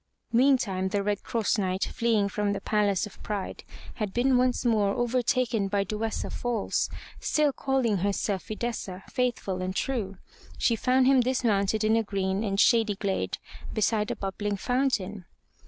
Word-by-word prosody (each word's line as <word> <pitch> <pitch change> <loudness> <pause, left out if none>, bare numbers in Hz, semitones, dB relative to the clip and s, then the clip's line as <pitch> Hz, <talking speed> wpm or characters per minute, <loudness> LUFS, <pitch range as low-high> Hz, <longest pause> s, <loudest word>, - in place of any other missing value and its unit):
Meantime 235 -7 +3
the 200 +1 -1
Red 205 0 -1
Cross 225 -2 0
Knight 190 -1 0
fleeing 225 -3 +1
from 205 0 -1
the 195 - -3
Palace 205 -2 +1
of 210 - -13
Pride 205 -2 -4 0.3
had 210 -4 -4
been 255 +2 +3
once 250 0 +2
more 210 -4 +2
overtaken 240 -3 +1
by 200 0 +1
Duessa 215 +3 -3
false, 240 -4 -1 0.3
still 300 -2 +2
calling 260 -7 +1
herself 200 0 -1
Fidessa, 215 -4 -4
faithful 240 -8 -1
and 185 +1 -3
true. 205 -8 -2 0.4
She 235 - +2
found 255 +3 +3
him 265 0 +5
dismounted 220 -5 +1
in 215 +1 +3
a 225 - +3
green 195 -1 -1
and 195 -2 -1
shady 225 -3 +4
glade 195 -1 -2 0.4
beside 215 0 +1
a - - -1
bubbling 200 +1 -3
fountain. 210 -6 -1
210 Hz, 155 wpm, -27 LUFS, 200-240 Hz, 0.4 s, him